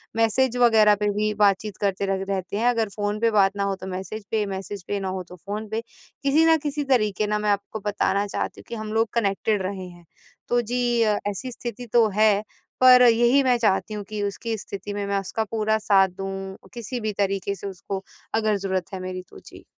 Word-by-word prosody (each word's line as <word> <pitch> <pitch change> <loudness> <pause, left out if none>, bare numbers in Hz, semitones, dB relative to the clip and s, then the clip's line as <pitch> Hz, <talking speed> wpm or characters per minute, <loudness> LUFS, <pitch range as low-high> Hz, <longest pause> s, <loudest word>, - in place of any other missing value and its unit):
Message 230 +3 +2
वगैरह 220 -4 +6
पे 210 - +2
भी 210 0 0
बातचीत 200 0 +2
करते 200 -1 0
रग 190 0 -4
रहते 195 0 -2
हैं 230 +3 +1
अगर 225 -3 0
फोन 205 0 -2
पे 230 0 +2
बात 195 -2 +3
ना 200 - 0
हो 200 0 0
तो - - -6
मैसेज 190 +3 -6
पे, 215 -2 +1
मैसेज 195 0 -6
पे 205 - -1
ना 190 -1 -3
हो 185 0 -4
तो 180 - -10
फोन 205 +5 -6
पे, 220 +1 -2 0.4
किसी 290 +4 +4
ना 325 0 +5
किसी 295 0 -1
तरीक़े 215 -4 +2
ना 210 0 0
मैं 210 0 0
आपको 200 +2 -2
बताना 205 -1 +1
चाहती - - -4
हूँ - - -23
कि 235 - -4
हम 215 -1 -5
लोग 225 0 +2
कनेक्टेड 205 -1 +1
रहे 185 -1 -4
हैं। 175 -1 -15 0.4
तो 240 0 +3
जी 240 0 0
अ, 210 -2 +2
ऐसी 205 +6 -5
स्थिति 240 0 -6
तो 235 -2 +6
है 215 -1 +4 0.4
पर 255 -1 +8
यही 240 +4 +4
मैं 250 -2 +3
चाहती 215 -2 +1
हूँ 210 -1 -4
कि 210 -1 -3
उसकी 220 +3 -3
स्थिति 205 0 -7
में 200 0 -3
मैं 200 0 +1
उसका 195 +3 -2
पूरा 220 -1 +1
साथ 200 -3 +4
दूँ, 195 +1 -6 0.2
किसी 240 +1 -5
भी 215 -1 -2
तरीके 195 0 -1
से 200 - -7
उसको 195 0 -5 0.3
अगर 215 -2 +2
ज़रूरत 190 -1 -3
है 190 - -4
मेरी 185 0 -5
तो। - - -13
जी। - - -13
210 Hz, 220 wpm, -24 LUFS, 195-225 Hz, 0.4 s, पर